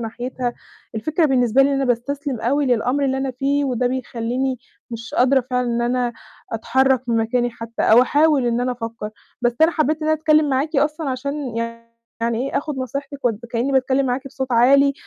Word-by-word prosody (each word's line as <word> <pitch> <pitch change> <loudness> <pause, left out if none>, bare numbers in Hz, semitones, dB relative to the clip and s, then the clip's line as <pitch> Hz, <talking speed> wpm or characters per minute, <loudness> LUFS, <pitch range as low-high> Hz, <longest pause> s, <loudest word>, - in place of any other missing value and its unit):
صناحيتها. 245 +2 -4 0.4
الفكرة 310 +9 0
بالنسبة 255 -2 +3
لي 270 - +3
إن - - +1
أنا 275 0 0
باستسلِم 260 +1 -2
أوي 280 +4 +1
للأمر 250 +3 +1
اللي 265 -1 0
أنا 270 0 -1
فيه، 280 +3 0
وده 250 -2 0
بيخلّيني 250 +1 -2 0.3
مش 230 -1 -7
قادرة 265 +2 +4
فعلًا 250 0 0
إن 235 0 0
أنا 245 0 0 0.4
أتحرك 260 +3 +2
من 230 - +2
مكاني 240 +2 +1
حتى، 230 0 -6
أو 230 +3 +6
أحاول 290 -1 +3
إن 235 0 +1
أنا 250 0 0
أفكّر. 230 -3 -6 0.3
بس 240 -1 +2
أنا 320 - +6
حبّيت 310 -1 0
إن 310 - -1
أنا - - +4
أتكلّم 310 -1 +3
معاكِ 280 +4 0
أصلًا 300 +1 0
عشان 270 -1 -4 0.6
يعني 230 0 0
إيه - - 0
آخُد 290 -1 -5
نصيحتك 275 +2 -5
و 245 - +4 0.2
كإني 245 +4 0
باتكلّم 265 +1 +2
معاكِ 255 +2 -2
بصوت 265 -1 -4
عالي 275 +4 +5
260 Hz, 185 wpm, -21 LUFS, 240-280 Hz, 0.6 s, أو